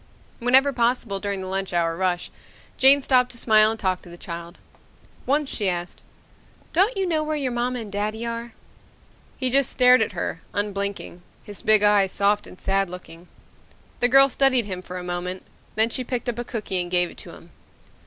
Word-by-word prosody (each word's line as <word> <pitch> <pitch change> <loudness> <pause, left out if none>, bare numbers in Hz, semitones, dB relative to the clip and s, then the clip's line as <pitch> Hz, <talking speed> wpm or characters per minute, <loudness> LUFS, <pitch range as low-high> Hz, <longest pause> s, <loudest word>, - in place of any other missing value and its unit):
Whenever 265 +3 +4
possible 235 -4 0
during 200 -1 -4
the 185 - -6
lunch 190 0 -3
hour 165 -1 0
rush, 180 0 -2 0.4
Jane 275 +1 +7
stopped 250 -2 +3
to - - -11
smile 215 -2 +4
and 225 0 -4
talk 185 -2 -1
to - - -15
the 175 - -11
child. 170 0 -8 0.7
Once 290 +2 +1
she 205 -6 -1
asked, 175 0 -5 0.7
"Don't 390 +7 +2
you 385 - 0
know 325 -3 0
where 310 0 -2
your 275 -4 -2
mama 245 +1 -2
and 210 -3 -9
daddy 215 +3 -3
are?" 235 0 -5 0.8
He 255 -2 -1
just 275 0 +3
stared 250 -2 +5
at 220 - -1
her, 165 - -4
unblinking, 200 -3 -3 0.2
his 205 -1 -9
big 215 -1 +4
eyes 205 -2 +4
soft 205 +1 +1
and 185 - -14
sad 195 -1 0
looking. 180 -1 -11 0.7
The 245 - +2
girl 270 +1 +7
studied 260 -3 +2
him 185 -3 -5
for 180 0 -8
a 180 - -6
moment, 180 +1 -4 0.3
then 220 +2 +2
she 255 - -2
picked 250 -1 -4
up 240 -1 -3
a - - -2
cookie 210 -6 -3
and 175 - -5
gave 175 -1 +1
it - - -17
to - - -11
him. - - -16
215 Hz, 195 wpm, -23 LUFS, 185-250 Hz, 0.8 s, Jane